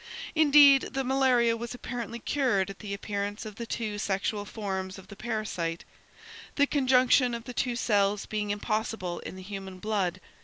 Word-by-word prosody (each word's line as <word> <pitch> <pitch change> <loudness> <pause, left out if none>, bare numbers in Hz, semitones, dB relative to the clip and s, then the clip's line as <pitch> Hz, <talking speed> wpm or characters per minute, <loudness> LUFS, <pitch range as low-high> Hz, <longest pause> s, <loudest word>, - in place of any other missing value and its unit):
Indeed, 290 -3 +7
the 270 - 0
malaria 255 -3 +3
was 235 +1 -6
apparently 240 -2 -5
cured 235 -7 0
at 195 - -13
the 205 - -7
appearance 205 +1 -3
of 215 -1 -8
the 235 - -5
two 215 -3 -3
sexual 205 +1 -1
forms 190 -3 -4
of 190 0 -13
the 200 - -9
parasite, 210 -7 -3 0.7
the 285 - +4
conjunction 255 -3 +3
of 235 - -6
the 250 - -8
two 245 -1 -1
cells 205 -3 +1
being 210 -1 -3
impossible 205 -3 -2
in - - -8
the 185 - -9
human 195 -1 -7
blood. 185 -3 -1
215 Hz, 165 wpm, -28 LUFS, 200-245 Hz, 0.7 s, Indeed